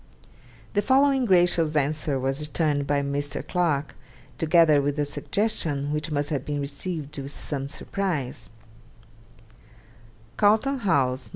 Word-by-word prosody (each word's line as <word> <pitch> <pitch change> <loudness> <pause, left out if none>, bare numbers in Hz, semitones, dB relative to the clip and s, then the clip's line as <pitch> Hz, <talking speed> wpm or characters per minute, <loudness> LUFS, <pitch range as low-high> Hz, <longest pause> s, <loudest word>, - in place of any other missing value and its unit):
The 205 - +2
following 270 +2 +3
gracious 175 -5 +3
answer 145 -1 0
was 135 +2 -1
returned 150 -2 -1
by 140 0 +1
Mr. 140 0 -3
Clarke, 155 -5 0 0.5
together 160 -2 +5
with 145 +1 -1
a 145 - +1
suggestion 145 -4 -1
which 150 +1 -2
must 145 0 -2
have 140 -4 -1
been 145 -1 -3
received 145 +2 -4
with 135 0 -6
some 140 -1 -3
surprise: 170 -7 -4 1.9
'Carlton 220 +7 +3
House, 135 - +1
Nov. - - -15
150 Hz, 125 wpm, -25 LUFS, 140-180 Hz, 1.9 s, together